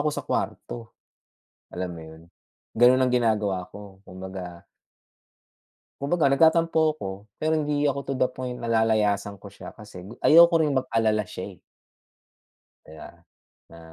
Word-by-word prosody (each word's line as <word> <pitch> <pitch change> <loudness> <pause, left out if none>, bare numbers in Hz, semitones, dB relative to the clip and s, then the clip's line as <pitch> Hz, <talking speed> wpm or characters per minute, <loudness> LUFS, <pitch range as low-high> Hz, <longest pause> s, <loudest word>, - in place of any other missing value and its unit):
ako 150 - +1
sa 150 - -4
kwarto, 115 -2 -5 0.8
alam 90 0 -4
mo 85 -2 -9
'yun, 80 0 -13 0.6
ganun 125 +2 +5
ang 130 - +2
ginagawa 105 -6 0
ko 100 -2 -12
kumbaga 95 -2 -9 1.4
Kumbaga, 150 +3 +1
nagtatampo 160 +1 +3
ako, 100 - -6 0.3
pero 155 +1 -1
hindi 150 -1 -1
ako 140 -1 0
to 135 - -1
the 130 - +2
point 125 -1 -6
na 115 - -4
lalayasan 105 -3 +1
ko 100 0 -13
siya, - - -11
kasi 105 -5 -12
gu - - -10
ayoko 170 +2 +7
rin 150 -2 +1
mag-alala 115 -5 0
siya, 95 +1 -8
eh. - - -27 1.3
Kaya 80 0 -12 0.6
na 85 - -14
115 Hz, 140 wpm, -25 LUFS, 95-140 Hz, 1.4 s, ayoko